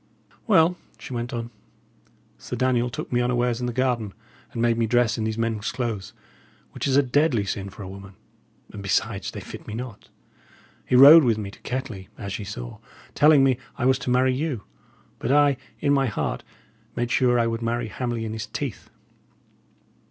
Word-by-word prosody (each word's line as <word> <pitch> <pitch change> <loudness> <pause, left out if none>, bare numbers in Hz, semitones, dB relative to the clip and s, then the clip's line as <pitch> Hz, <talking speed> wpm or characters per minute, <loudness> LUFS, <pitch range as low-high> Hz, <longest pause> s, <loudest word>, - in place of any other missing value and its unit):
"Well," 180 -4 +4 0.2
she 135 - -9
went 120 +1 -3
on, 120 -1 -5 0.9
"Sir - - -6
Daniel 125 -1 +1
took - - -6
me 120 - +3
unawares 120 -1 0
in 125 - -2
the - - -1
garden, 120 -5 -1 0.4
and - - -6
made 115 0 +3
me 115 -1 0
dress 120 0 +2
in 110 - -2
these 110 0 -2
men's 115 -2 -1
clothes, 115 -6 -4 0.6
which - - -3
is 135 0 +3
a 140 - +5
deadly 130 -4 +2
sin 100 0 -4
for 100 +2 -10
a - - -7
woman; 95 0 -10 0.6
and, 105 - -7
besides, 100 +1 -1
they - - -7
fit - - -10
me 105 - -5
not. 120 -2 -8 0.8
He - - +2
rode 145 +5 +10
with 115 -4 +2
me 100 -2 -5
to - - -16
Kettley, 125 -7 -5
as 100 +1 -5
ye 105 - -6
saw, - - -7 0.3
telling 150 -1 +6
me 130 -2 +2 0.2
I 125 - -1
was 130 0 +3
to 125 - -4
marry 130 +1 +3
you; 135 -5 -2 0.6
but 125 - -1
I, 145 -1 +4 0.2
in 145 -1 +3
my 135 -1 +2
heart, 110 - -3 0.5
made 120 0 -2
sure 125 -1 +3
I 120 - +3
would 115 0 -2
marry 115 0 -2
Hamley 120 -1 -3
in 110 - -4
his 110 -1 -5
teeth." 135 0 -5
120 Hz, 190 wpm, -24 LUFS, 110-130 Hz, 0.9 s, rode